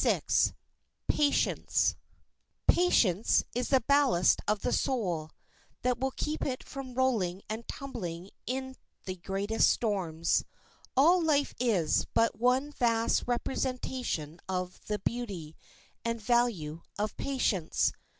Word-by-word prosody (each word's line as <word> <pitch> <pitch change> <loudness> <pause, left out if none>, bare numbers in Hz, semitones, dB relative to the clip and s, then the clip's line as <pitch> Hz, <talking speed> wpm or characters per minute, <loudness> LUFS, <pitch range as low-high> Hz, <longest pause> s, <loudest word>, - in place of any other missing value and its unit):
] - - -49
Patience 290 -1 +2
is - - +3 1.8
the 265 -3 +4
ballast 280 -11 +4
of 210 -1 +1
the - - -1
soul, 180 - 0 0.5
that 250 -1 +1
will 265 +1 +1
keep 305 +1 -2
it 255 -2 -2
from 265 -2 -8
rolling 210 -8 +1
and 220 +2 -5
tumbling 190 -9 -6 0.2
in 260 +1 -3 0.3
the 185 -1 -4
greatest 195 +5 +1
storms. 175 -7 +1 0.5
All 340 +7 +6
life 295 -3 +2
is 205 -11 +2
but 230 0 +3
one 255 +4 +2
vast 230 -4 +1
representation 245 - -2
of 185 -1 -3
the 210 - 0
beauty 195 -8 -4 0.5
and 230 0 -1
value 210 -9 +1 0.2
of 210 +1 -2
patience. 235 - 0
230 Hz, 110 wpm, -30 LUFS, 185-260 Hz, 1.8 s, All